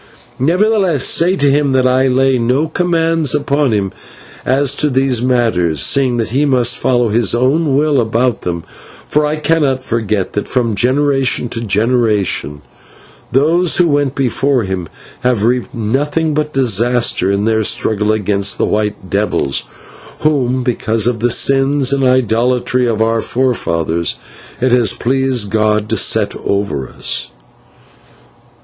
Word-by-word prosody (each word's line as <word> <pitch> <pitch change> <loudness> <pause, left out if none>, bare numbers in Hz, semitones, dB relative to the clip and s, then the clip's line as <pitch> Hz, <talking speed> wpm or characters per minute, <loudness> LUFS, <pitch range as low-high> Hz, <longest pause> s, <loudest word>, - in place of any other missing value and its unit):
"'Nevertheless, 180 - +1
say 175 +3 +2
to 145 -6 +2
him 140 -1 +1
that 130 -1 +2
I 130 +1 +2
lay 130 0 +2
no 125 +7 0
commands 165 -3 0
upon 145 -2 0
him 100 -3 -1 0.5
as 135 +1 +1
to 150 - +1
these 130 -3 +1
matters, 115 - 0
seeing 130 - +2
that 115 -2 -2
he 135 +4 +1
must 125 -4 +1
follow 120 -2 +1
his 115 +1 +2
own 135 +4 +1
will 145 -3 +2
about 115 +2 0
them, 85 -2 -4 0.4
for 150 0 0
I 150 - -1
cannot 150 -4 0
forget 110 -5 -2
that, 105 - -3
from 120 -3 -1
generation 130 +2 +1
to 115 - -4
generation, 105 - 0 0.7
those 165 +6 +2
who 175 -2 +3
went 145 -2 0
before 135 -1 0
him 95 -3 -4 0.3
have 125 -4 0
reaped 125 +1 0
nothing 145 +8 -1
but 150 0 -2
disaster 120 -4 +1
in 100 +1 0
their 110 -1 +1
struggle 105 0 0
against 100 -2 0
the - - +1
white 105 -2 -2
devils, 100 -9 -1 0.6
whom, 130 -4 0
because 115 -3 -1
of 120 -2 0
the 120 +2 +1
sins 135 +2 +2
and 135 -1 0
idolatry 125 0 +1
of 110 -1 0
our 115 0 0
forefathers, 85 -11 -1 0.4
it 130 0 +1
has 120 -2 +3
pleased 130 -4 -1
God 110 -1 +1
to - - +2
set - - +1
over 100 -10 -2
us.' - - -4
125 Hz, 145 wpm, -14 LUFS, 110-140 Hz, 0.7 s, who